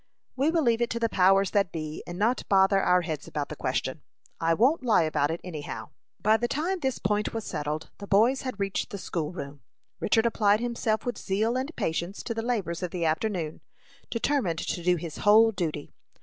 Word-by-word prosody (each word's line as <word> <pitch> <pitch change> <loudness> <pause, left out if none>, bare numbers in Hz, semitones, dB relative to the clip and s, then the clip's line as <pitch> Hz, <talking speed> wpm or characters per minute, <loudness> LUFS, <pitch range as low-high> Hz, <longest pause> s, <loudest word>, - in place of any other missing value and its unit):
"We 275 +4 +2
will 325 -1 +2
leave 235 -2 +2
it 235 - +1
to 235 - -2
the 230 -1 +1
powers 195 0 +4
that 200 -5 +2
be, 155 -1 -5
and 175 - -6
not 230 +6 +1
bother 195 0 +4
our 180 -1 +4
heads 155 -4 -4
about 145 -1 -3
the - - -5
question. - - -2 0.4
I 165 0 +2
won't 260 - +3
lie 225 -8 +4
about 150 -2 +1
it, 165 +1 -2
any 165 -5 -6
how." - - -7 0.3
By 215 +2 +4
the 240 - -1
time 345 +9 -1
this 265 -5 -1
point 210 +3 -1
was 225 - -2
settled 150 +2 -4
the 200 - -8
boys 225 +7 +4
had 255 -6 -5
reached 195 +3 -1
the 205 - -5
school 165 -5 -3
room. 140 -5 -8 0.4
Richard 225 +2 +2
applied 210 -2 +3
himself 230 -2 -1
with 245 - -3
zeal 215 +5 0
and 265 +4 -2
patience 170 +4 -2
to 230 - -3
the 225 - -3
labors 205 -8 -2
of 180 - -2
the 170 -1 -2
afternoon, 165 -1 -1 0.5
determined 230 - 0
to 175 - -3
do 180 +1 +3
his 165 -2 -6
whole 220 +2 +6
duty. 160 -7 -4
200 Hz, 210 wpm, -27 LUFS, 170-230 Hz, 0.5 s, whole